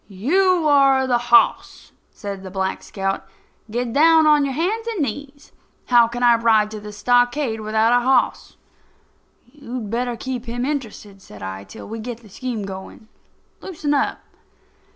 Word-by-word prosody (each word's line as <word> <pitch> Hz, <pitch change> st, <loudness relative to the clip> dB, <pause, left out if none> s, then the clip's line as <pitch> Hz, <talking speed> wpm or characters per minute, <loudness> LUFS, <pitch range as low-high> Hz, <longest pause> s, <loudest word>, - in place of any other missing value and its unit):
"You 335 Hz, -, +1 dB
are 275 Hz, -2 st, +4 dB
the 245 Hz, -2 st, +1 dB
hoss," 235 Hz, -, +2 dB, 0.2 s
says 200 Hz, -2 st, -7 dB
Black 190 Hz, 0 st, -3 dB
Scout. 195 Hz, -1 st, -3 dB, 0.5 s
"Get 235 Hz, +1 st, -3 dB
down 320 Hz, +2 st, +5 dB
on 300 Hz, -2 st, +4 dB
your 275 Hz, -, -3 dB
hands 425 Hz, +9 st, -1 dB
and 450 Hz, -4 st, -3 dB
knees. 285 Hz, +3 st, -7 dB, 0.4 s
How 240 Hz, -2 st, +6 dB
can 240 Hz, +1 st, -5 dB
I 240 Hz, -1 st, +5 dB
ride 220 Hz, -2 st, +2 dB
to 215 Hz, -, -6 dB
the 210 Hz, 0 st, -9 dB
stockade 245 Hz, +2 st, +1 dB
without 220 Hz, +2 st, +1 dB
a 245 Hz, 0 st, +3 dB
hoss?" 255 Hz, -1 st, 0 dB, 0.9 s
"You'd 245 Hz, -4 st, -8 dB
better 240 Hz, 0 st, -2 dB
keep 255 Hz, -1 st, -5 dB
him 245 Hz, +1 st, -3 dB
interested," 220 Hz, -8 st, -5 dB
said 105 Hz, -, -13 dB
I, 95 Hz, +1 st, -6 dB
"till 95 Hz, -, -11 dB
we 225 Hz, +1 st, -6 dB
get 235 Hz, +1 st, -7 dB
the 215 Hz, -, -17 dB
scheme 235 Hz, +1 st, -5 dB
going. 195 Hz, +3 st, -9 dB, 0.5 s
Loosen 310 Hz, -5 st, -3 dB
up." 280 Hz, -, 0 dB
240 Hz, 155 wpm, -21 LUFS, 215-280 Hz, 0.9 s, How